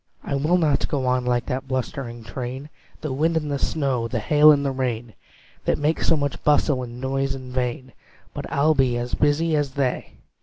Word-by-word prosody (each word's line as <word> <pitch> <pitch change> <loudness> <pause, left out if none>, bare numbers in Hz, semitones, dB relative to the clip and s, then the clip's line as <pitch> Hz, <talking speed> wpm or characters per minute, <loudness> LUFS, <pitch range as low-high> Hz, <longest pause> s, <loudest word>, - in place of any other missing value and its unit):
I - - -4
will 150 +6 +2
not 150 -5 +2
go 135 -3 -1
on 125 0 +1
like 120 -1 +1
that 130 +1 -3
blustering 125 -2 -4
train, 130 +5 -6 0.3
The 150 -4 -3
wind 160 +4 +1
and 150 -2 -2
the 140 - -1
snow, 135 -7 0
the 120 - -3
hail 150 +7 +6
and 140 -1 +2
the 135 - +1
rain, 120 -4 -3 0.5
That - - +2
make 150 +2 0
so 165 - +3
much 145 -1 -3
bustle 145 -2 +3
and 120 -1 -7
noise 135 +1 -1
in 130 -1 -9
vain, 125 0 -3 0.4
But - - -6
I'll 150 +3 +3
be 130 -4 +2
as 120 +1 -4
busy 155 +2 +2
as 145 -3 0
they!" 135 -3 -1
135 Hz, 200 wpm, -23 LUFS, 125-145 Hz, 0.5 s, hail